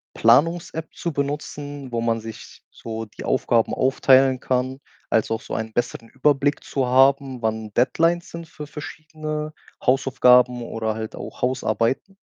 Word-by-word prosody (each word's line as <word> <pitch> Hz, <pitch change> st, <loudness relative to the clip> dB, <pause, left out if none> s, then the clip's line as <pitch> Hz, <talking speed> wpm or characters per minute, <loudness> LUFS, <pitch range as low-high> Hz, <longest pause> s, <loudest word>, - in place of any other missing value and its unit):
Planungs-App 160 Hz, +6 st, +2 dB
zu 170 Hz, -3 st, -4 dB
benutzen, 145 Hz, -1 st, -4 dB
wo 115 Hz, -, 0 dB
man 115 Hz, -1 st, 0 dB
sich 110 Hz, 0 st, -10 dB
so 115 Hz, 0 st, -6 dB
die 105 Hz, -, -11 dB
Aufgaben 120 Hz, -3 st, +1 dB
aufteilen 130 Hz, 0 st, +4 dB
kann, 130 Hz, +1 st, -1 dB, 0.3 s
also, 115 Hz, 0 st, +1 dB
auch -, -, -7 dB
so -, -, -8 dB
einen 110 Hz, 0 st, -3 dB
besseren 115 Hz, -1 st, -3 dB
Überblick 145 Hz, +1 st, +1 dB
zu 130 Hz, -3 st, -1 dB
haben, 135 Hz, 0 st, +3 dB
wann 110 Hz, -1 st, -2 dB
Deadlines 165 Hz, +8 st, +2 dB
sind 170 Hz, -1 st, -8 dB
für 150 Hz, -1 st, -9 dB
verschiedene 155 Hz, 0 st, -6 dB, 0.3 s
Hausaufgaben 125 Hz, -2 st, +4 dB
oder 110 Hz, -1 st, -3 dB
halt 110 Hz, -1 st, -6 dB
auch -, -, -9 dB
Hausarbeiten? 130 Hz, -, 0 dB
130 Hz, 140 wpm, -23 LUFS, 115-145 Hz, 0.3 s, aufteilen